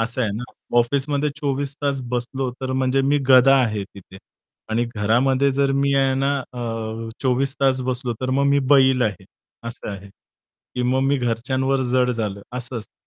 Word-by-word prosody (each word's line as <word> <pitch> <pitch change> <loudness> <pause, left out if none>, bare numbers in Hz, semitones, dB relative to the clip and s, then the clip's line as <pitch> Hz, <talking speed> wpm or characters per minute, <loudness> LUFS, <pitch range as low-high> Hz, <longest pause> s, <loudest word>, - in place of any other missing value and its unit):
असं 120 +3 0
आहे 105 - 0
ना. 120 - -5 0.4
ऑफिसमध्ये 140 +4 +1
24 140 -2 -2
तास 140 -1 0
बसलो 125 +2 -2
तर 130 0 -3
म्हणजे 130 +1 +1
मी 145 +2 +2
गधा 130 +1 +7
आहे 105 -4 -1
तिथे 95 -1 -15 0.5
आणि 115 +2 +1
घरामध्ये 130 +6 +2
जर 140 0 +1
मी 140 0 +1
आहे 135 -1 +2
ना 135 +1 +1
अ, 125 -1 -11 0.6
24 135 +1 +1
तास 135 -1 +2
बसलो, 125 -1 -2
तर 130 0 -2
मग 140 +2 +2
मी 140 0 +4
बैल 130 -2 +5
आहे, 105 -5 -2 0.4
असं 115 - -6
आहे 100 0 -8 0.7
की 125 - -1
मग 130 +2 +1
मी 140 +1 +2
घरच्यांवर 130 +3 0
जड 125 -1 +3
झालो 105 -4 -3 0.2
असं 120 0 -4
असतं. 110 - -11
130 Hz, 175 wpm, -22 LUFS, 120-135 Hz, 0.7 s, गधा